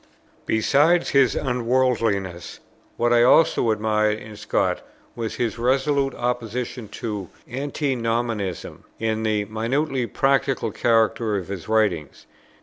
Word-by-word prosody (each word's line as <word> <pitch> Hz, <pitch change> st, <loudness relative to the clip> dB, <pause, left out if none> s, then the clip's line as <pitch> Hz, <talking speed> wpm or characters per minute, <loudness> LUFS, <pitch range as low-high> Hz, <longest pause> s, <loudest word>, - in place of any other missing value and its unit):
Besides 150 Hz, +10 st, +3 dB
his 135 Hz, -3 st, +4 dB
unworldliness, 115 Hz, -8 st, 0 dB, 0.4 s
what 120 Hz, 0 st, +2 dB
I 120 Hz, -, +5 dB
also 125 Hz, -1 st, +4 dB
admired 110 Hz, 0 st, +1 dB
in 110 Hz, -1 st, -10 dB
Scott -, -, -1 dB, 0.3 s
was 115 Hz, -1 st, -4 dB
his 115 Hz, -1 st, -2 dB
resolute 135 Hz, +2 st, +1 dB
opposition 120 Hz, -1 st, -3 dB, 0.2 s
to 105 Hz, -5 st, -4 dB, 0.2 s
Antinomianism, 120 Hz, -, -2 dB, 0.2 s
and 110 Hz, 0 st, -1 dB
the 105 Hz, -2 st, 0 dB
minutely 120 Hz, +5 st, -1 dB
practical 135 Hz, -4 st, +1 dB
character 115 Hz, -1 st, +1 dB
of 95 Hz, -1 st, -6 dB
his 100 Hz, -1 st, -6 dB
writings. 100 Hz, -10 st, 0 dB
115 Hz, 110 wpm, -23 LUFS, 110-130 Hz, 0.4 s, I